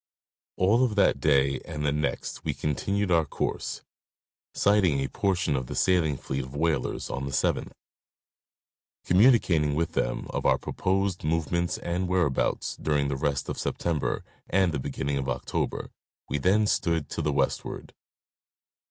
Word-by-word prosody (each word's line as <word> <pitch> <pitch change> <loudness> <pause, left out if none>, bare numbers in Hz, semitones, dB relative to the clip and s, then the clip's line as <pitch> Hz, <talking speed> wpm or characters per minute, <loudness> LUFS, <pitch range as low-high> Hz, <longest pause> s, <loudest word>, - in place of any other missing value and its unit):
All 105 +7 +4
of 115 -5 +1
that 100 - +3
day 70 -2 +3
and 75 -3 -4
the 70 - +2
next 75 +1 -2
we - - -2
continued 95 +7 -1
our 85 -1 +4
course, 75 - -3 0.7
sighting 100 -8 +3
a 70 - -1
portion 90 -5 0
of 65 -2 -2
the - - -6
sailing 80 -6 +2
fleet 65 +1 -3
of 65 +2 -10
whalers 80 -1 -1
on 70 +1 -3
the 70 - -4
7th. - - 0 1.4
Communi 115 +7 +6
cating 75 -6 +1
with 80 +1 0
them - - -1
of - - -2
our - - +4
proposed 95 0 -1
movements 80 +2 0
and 90 +2 -2
whereabouts 90 -7 0
during 75 -2 0
the 70 - -1
rest 70 0 -1
of - - -4
September 80 -5 -1 0.3
and 95 -3 +3
the 75 - -2
beginning 70 +1 -2
of 65 - -3
October, - - -3 0.4
we 75 - -1
then 100 +8 +3
stood 85 -7 0
to - - -2
the - - 0
westward. - - -2
80 Hz, 155 wpm, -27 LUFS, 70-95 Hz, 1.4 s, Communi